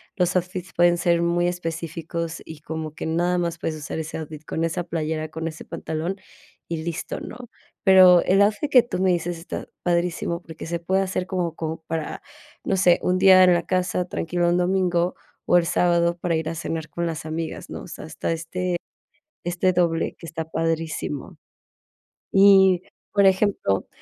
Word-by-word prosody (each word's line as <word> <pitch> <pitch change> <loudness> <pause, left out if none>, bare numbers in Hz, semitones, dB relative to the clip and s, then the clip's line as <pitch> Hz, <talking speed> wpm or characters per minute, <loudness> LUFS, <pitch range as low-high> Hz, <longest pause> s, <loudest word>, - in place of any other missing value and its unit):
los 180 -2 +1
outfits 180 0 -2
pueden 175 0 +4
ser 170 -1 +2
muy 170 +1 +1
específicos, 165 -1 -4
y 160 -1 -11
como 155 -1 -5
que - - -5
nada 175 +3 +1
más 170 -1 -2
puedes 160 - -2
usar 155 +1 -5
ese 160 0 -5
outfit 155 -1 -8
con 160 - -2
esa 165 +2 -1
playera, 160 -2 -3
con 160 +1 -4
ese 160 -1 -7
pantalón 165 +2 -4 0.5
y 165 - -3
listo, 170 0 -4
¿no? - - -8 0.5
Pero, 185 -2 +8
el 195 +2 +3
outfit 215 +9 +2
que 250 -3 +7
tú 240 - -4
me 190 0 +3
dices 175 0 -1
está 165 - -6 0.2
padrísimo, 170 0 0
porque, 160 -2 -9
se 170 +1 -3
puede 190 +3 +1
hacer 185 -1 -2
como 180 -4 -2
como 160 0 -4
para, 160 -2 -4 0.4
no 195 - 0
sé, 180 -2 +4
un 180 - +2
día 185 0 +7
en 180 -1 +6
la 175 -1 0
casa 180 -1 0
tranquilo 175 0 -1
un 175 - +2
domingo, 180 -1 +1 0.3
o 175 - +5
el 175 - +2
sábado 170 0 +2
para 175 -1 -1
ir 160 0 -3
a 165 - -4
cenar 160 -1 -4
con 170 +3 -3
las 160 -2 -4
amigas, 160 +1 -5
¿no? - - -6
O - - -10
sea, - - -8
está - - -4
este 175 +2 -2 0.7
este 175 +2 +1
doble, 170 -2 +1
que - - -11
está 160 -1 -5
padrísimo. 165 -3 -3 0.9
Y, 195 -2 +6 0.3
por 200 -1 +4
ejemplo, 190 - +1
170 Hz, 180 wpm, -23 LUFS, 165-180 Hz, 0.9 s, Pero